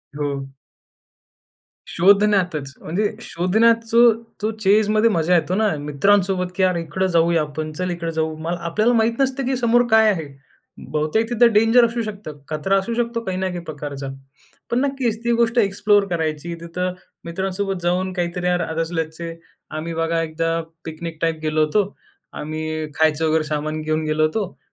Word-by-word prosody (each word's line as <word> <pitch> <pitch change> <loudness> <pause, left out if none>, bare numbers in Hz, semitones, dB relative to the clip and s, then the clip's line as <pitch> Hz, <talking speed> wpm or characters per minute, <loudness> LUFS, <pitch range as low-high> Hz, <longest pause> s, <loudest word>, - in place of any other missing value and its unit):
हो. 140 -2 -3 1.4
शोधण्यातचं. 185 -6 +2
म्हणजे 200 +7 -1
शोधण्याचं 230 +5 +3 0.2
तो 215 +1 0
चेजमध्ये 215 +3 +4
मजा 175 -1 +2
येतो 175 +2 +1
ना 220 +1 +2
मित्रांसोबत 180 +5 +2
की 190 - +1
यार 185 -1 +3
इकडं 170 +3 -1
जाऊया 170 -1 +3
आपण. 155 +1 -4
चल 180 +4 -3
इकडं 170 -1 -3
जाऊ. 160 0 -1
मला 170 +2 -3
आपल्याला 215 +8 +2
माहीत 230 +2 +1
नसतं 265 -1 0
की 265 0 0
समोर 240 0 +3
काय 220 -1 +6
आहे? 165 -6 -3 0.6
बहुतेक 155 +10 0
तिथं 240 0 +4
डेंजर 225 +3 +5
असू 235 +1 -2
शकतं. 200 -8 -7
खतरा 155 +6 +1
असू 230 +4 -4
शकतो 235 0 -1
काही 185 -2 -3
ना 190 0 -1
काही 175 -1 -4
प्रकारचा. 145 -3 -6 0.6
पण 240 - +2
नक्कीच 260 -5 -1
ती 235 - +1
गोष्ट 235 +1 +2 0.5
करायची. 160 -1 -2
तिथं 180 +2 -3 0.3
मित्रांसोबत 190 +2 -3
जाऊन 185 +2 0
काहीतरी 180 0 -2
यार 180 0 +2
आदत 160 0 -3
असल्याचे. 165 0 -4 0.4
आम्ही 160 +2 -5
बघा 165 0 0
एकदा 165 +1 -1 0.2
पिकनिक 160 0 -6
टाइप 165 -1 0
गेलो 155 0 +2
होतो. 200 +6 0 0.4
आम्ही 155 0 -4
खायचं 160 0 +2
वगैरे 155 0 +2
सामान 155 +1 -3
घेऊन 155 0 -1
गेलो 155 0 +1
होतो 190 +4 -1
175 Hz, 155 wpm, -21 LUFS, 155-215 Hz, 1.4 s, काय